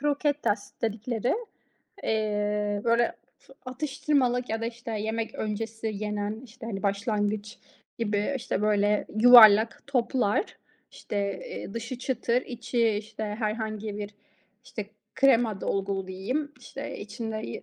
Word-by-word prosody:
croquetas 285 Hz, -8 st, 0 dB
dedikleri. 225 Hz, +2 st, 0 dB, 0.7 s
Eee, 210 Hz, -1 st, 0 dB
böyle, 235 Hz, 0 st, +3 dB, 0.3 s
f -, -, -19 dB
atıştırmalık 260 Hz, -2 st, 0 dB
ya 225 Hz, 0 st, -1 dB
da, 230 Hz, -, -1 dB
işte, 235 Hz, 0 st, -6 dB
yemek 220 Hz, +1 st, -2 dB
öncesi 220 Hz, +1 st, -3 dB
yenen, 210 Hz, +1 st, -3 dB
işte, 230 Hz, -1 st, -11 dB
hani, 195 Hz, -4 st, -4 dB
başlangıç 205 Hz, +1 st, -1 dB, 0.4 s
gibi, 210 Hz, +1 st, 0 dB
işte, 240 Hz, -5 st, -2 dB
böyle, 210 Hz, 0 st, +2 dB
yuvarlak 225 Hz, -2 st, +9 dB
toplar. 250 Hz, -, +1 dB, 0.5 s
İşte, 210 Hz, -, -6 dB, 0.3 s
eee, 195 Hz, -, -7 dB
dışı 230 Hz, +2 st, -4 dB
çıtır, 250 Hz, -1 st, 0 dB
içi, 240 Hz, -1 st, 0 dB
işte, 215 Hz, +1 st, -3 dB
herhangi 215 Hz, 0 st, -3 dB
bir, 205 Hz, -1 st, -4 dB, 0.5 s
işte, 215 Hz, -6 st, -6 dB, 0.3 s
krema 230 Hz, -7 st, +4 dB
dolgulu 195 Hz, -1 st, -1 dB
diyeyim. 255 Hz, +11 st, -3 dB
İşte, 275 Hz, +1 st, -7 dB
içinde 220 Hz, +2 st, -5 dB
y 120 Hz, -, -5 dB
220 Hz, 120 wpm, -27 LUFS, 210-245 Hz, 0.7 s, yuvarlak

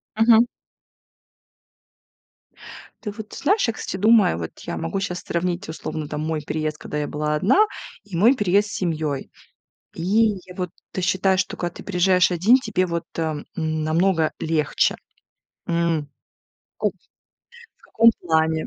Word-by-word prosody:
Мгм. 225 Hz, +1 st, +5 dB, 2.6 s
Ты 210 Hz, -, -3 dB
вот 215 Hz, 0 st, -9 dB
знаешь, 400 Hz, -, +1 dB
я, 230 Hz, -, 0 dB
кстати, 190 Hz, -, -5 dB
думаю, 210 Hz, -, +4 dB
вот 80 Hz, -, -7 dB
я -, -, -5 dB
могу 195 Hz, -, -2 dB
щас 180 Hz, -2 st, -3 dB
сравнить 175 Hz, +1 st, -2 dB
условно 155 Hz, -1 st, -5 dB
там 150 Hz, 0 st, -4 dB
мой 155 Hz, -1 st, -2 dB
переезд, 155 Hz, 0 st, -3 dB
когда 150 Hz, -, -6 dB
я 150 Hz, -, -1 dB
была 150 Hz, 0 st, -1 dB
одна, 260 Hz, -, +4 dB, 0.4 s
и 195 Hz, -4 st, -9 dB
мой 230 Hz, +10 st, +5 dB
переезд 205 Hz, -1 st, +2 dB
с -, -, -8 dB
семьёй. 155 Hz, -6 st, -2 dB, 0.6 s
И -, -, -7 dB, 0.4 s
я 180 Hz, 0 st, -12 dB
вот 180 Hz, -2 st, -3 dB, 0.2 s
ты 185 Hz, -, -3 dB
считаешь, 190 Hz, +1 st, +2 dB
что -, -, -6 dB
когда 175 Hz, -1 st, -3 dB
ты -, -, -9 dB
приезжаешь 180 Hz, -1 st, +3 dB
1, 200 Hz, +9 st, +5 dB
тебе 205 Hz, -7 st, 0 dB
вот, 170 Hz, -1 st, -3 dB
а, 160 Hz, -1 st, 0 dB
м, 145 Hz, -, -7 dB
намного 160 Hz, +1 st, +1 dB
легче? 155 Hz, -2 st, +1 dB, 0.7 s
М. 170 Hz, -3 st, 0 dB, 0.7 s
Ко -, -, +2 dB
В -, -, -9 dB, 0.9 s
каком 230 Hz, +1 st, +5 dB
плане? 160 Hz, -1 st, +1 dB
175 Hz, 150 wpm, -23 LUFS, 160-200 Hz, 2.6 s, Мгм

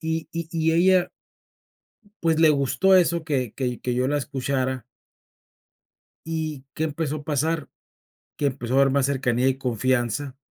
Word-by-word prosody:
Y 160 Hz, 0 st, -3 dB
y 165 Hz, -1 st, -4 dB
y 160 Hz, -1 st, +1 dB
ella, 180 Hz, +2 st, +3 dB, 1.1 s
pues, 165 Hz, -1 st, +2 dB
le 160 Hz, -, +6 dB
gustó 150 Hz, +7 st, +3 dB
eso 170 Hz, -2 st, +3 dB
que 130 Hz, -7 st, -1 dB
que 125 Hz, -3 st, -3 dB
que 125 Hz, -, -1 dB
yo 125 Hz, +1 st, +1 dB
la 145 Hz, +1 st, +1 dB
escuchara 130 Hz, -2 st, -2 dB, 1.4 s
¿Y 155 Hz, -4 st, -4 dB
qué 155 Hz, -, -1 dB
empezó 155 Hz, -1 st, -2 dB
a 145 Hz, -, -9 dB
pasar? 155 Hz, +1 st, -1 dB, 0.7 s
Que 145 Hz, -, +1 dB
empezó 130 Hz, -2 st, -2 dB
a -, -, +4 dB
haber 135 Hz, -, +4 dB
más 140 Hz, -1 st, +2 dB
cercanía 130 Hz, -2 st, +1 dB
y 135 Hz, -, 0 dB
confianza 130 Hz, +2 st, -1 dB
140 Hz, 155 wpm, -24 LUFS, 130-160 Hz, 1.4 s, le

